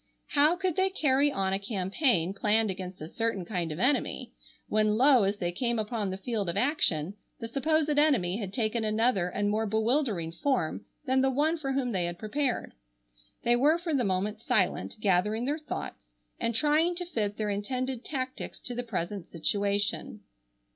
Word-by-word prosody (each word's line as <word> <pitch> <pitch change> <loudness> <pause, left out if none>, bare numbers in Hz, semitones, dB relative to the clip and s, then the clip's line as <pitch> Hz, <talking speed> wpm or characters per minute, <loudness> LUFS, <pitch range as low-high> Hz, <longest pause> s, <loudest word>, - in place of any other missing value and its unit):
How 300 +4 +4
could 370 -2 -1
they 380 0 +3
carry 290 -5 +2
on 190 -5 0
a 195 - 0
campaign 195 - +1
planned 215 +1 +2
against 185 -2 -7
a - - -6
certain 225 -2 -2
kind 175 -4 -2
of 150 - -5
enemy, 260 +8 0 0.4
when 215 0 +2
lo, 260 0 +6
as 200 +1 0
they 175 -3 -1
came 235 +6 -1
upon 215 -2 -2
the 190 - -4
field 205 -2 -2
of 170 - -3
action 195 - +1 0.3
the 230 - -4
supposed 310 +5 +1
enemy 220 - +3
had 200 -4 -4
taken 225 0 -1
another 215 -4 +1
and 205 +3 -1
more 215 +2 0
bewildering 220 - 0
form 180 - -1 0.2
than 260 -1 +2
the 265 - +3
one 295 +5 +2
for 275 -5 -3
whom 260 -2 0
they 185 -4 0
had 175 0 -4
prepared. 250 +5 -2 0.7
They 240 0 +4
were 295 +7 +4
for 340 -2 -3
the 265 -3 +2
moment 200 +2 -1
silent, - - 0
gathering 210 +3 +1
their 295 +4 -1
thoughts, 300 - -6 0.3
and 230 -1 -1
trying 310 +6 +2
to 355 0 -4
fit 210 -11 -2
their 210 -1 -1
intended 250 +5 -3
tactics 260 -3 -5
to 245 - -5
the 245 - -2
present 200 -5 -4
situation. 200 +4 -1
225 Hz, 180 wpm, -29 LUFS, 195-270 Hz, 0.7 s, lo